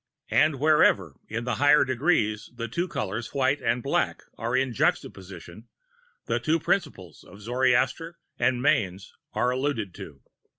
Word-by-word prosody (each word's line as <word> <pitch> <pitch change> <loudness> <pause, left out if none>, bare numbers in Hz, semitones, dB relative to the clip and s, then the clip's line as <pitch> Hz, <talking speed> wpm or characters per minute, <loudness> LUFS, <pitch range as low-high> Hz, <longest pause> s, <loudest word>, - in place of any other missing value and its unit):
And 150 -4 +3
wherever, 115 - +3
in 115 +2 -3
the 120 -3 -2
higher 145 0 +5
Degrees, 125 -5 0
the 115 -1 -4
two 170 +10 -2
colors 110 - -4
white 135 +1 +1
and 120 +1 0
black, - - -1
are 120 +3 -1
in 130 -2 0
juxtaposition, 155 +8 -3 0.6
the - - 0
two 160 +1 +1
Principles 140 - -2
of 100 - -15
Zoroaster 130 +8 0 0.2
and 125 0 +1
Manes 95 -7 0 0.2
are 125 - +1
alluded 125 -7 -2
to. 70 -4 -11
125 Hz, 140 wpm, -26 LUFS, 110-145 Hz, 0.6 s, higher